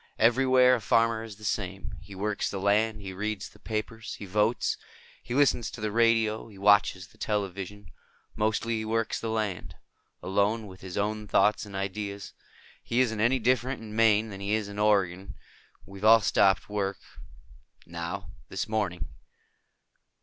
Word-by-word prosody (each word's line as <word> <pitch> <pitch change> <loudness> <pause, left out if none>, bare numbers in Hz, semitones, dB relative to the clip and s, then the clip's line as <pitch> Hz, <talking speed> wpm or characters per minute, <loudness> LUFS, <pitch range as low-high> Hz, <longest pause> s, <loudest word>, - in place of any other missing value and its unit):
Everywhere 125 +2 +5
a 125 - +1
farmer 115 0 +2
is 110 -2 -9
the 110 - -16
same. 95 -2 -3
He 100 -1 -12
works 105 +2 -1
the 100 - -4
land. 105 +2 +2
He 95 -1 -6
reads 105 +1 -3
the 105 - -20
papers. 110 +1 -4
He 100 - -8
votes. 105 +4 +1 0.5
He 120 - -5
listens 135 -4 +3
to - - -10
the 110 -1 -2
radio. 115 -1 +2
He 105 -3 -14
watches 100 -2 +4
the - - -24
television. 100 -2 -3 0.4
Mostly, 110 +2 0
he 110 - -3
works 115 0 -1
the 115 - -4
land. 105 -6 -3 0.5
Alone, 100 +4 +1
with 95 -2 -12
his 95 0 -7
own 105 +1 -1
thoughts 105 +1 +2
and 100 - -9
ideas. 100 +1 -4 0.5
He 120 - -1
isn't 115 -4 +1
any 120 +4 +3
different 130 +2 +1
in 110 -1 -9
Maine 110 -1 +4
than 100 0 -8
he 100 +2 0
is 110 -2 -2
in 100 0 -7
Oregon. 100 -3 +1 0.5
We've 100 0 -11
all 110 +1 +7
stopped 100 -2 +3
work. 100 -2 -2 0.9
Now. - - -6 0.2
This - - -3
morning." 90 - -2
105 Hz, 165 wpm, -28 LUFS, 100-115 Hz, 0.9 s, all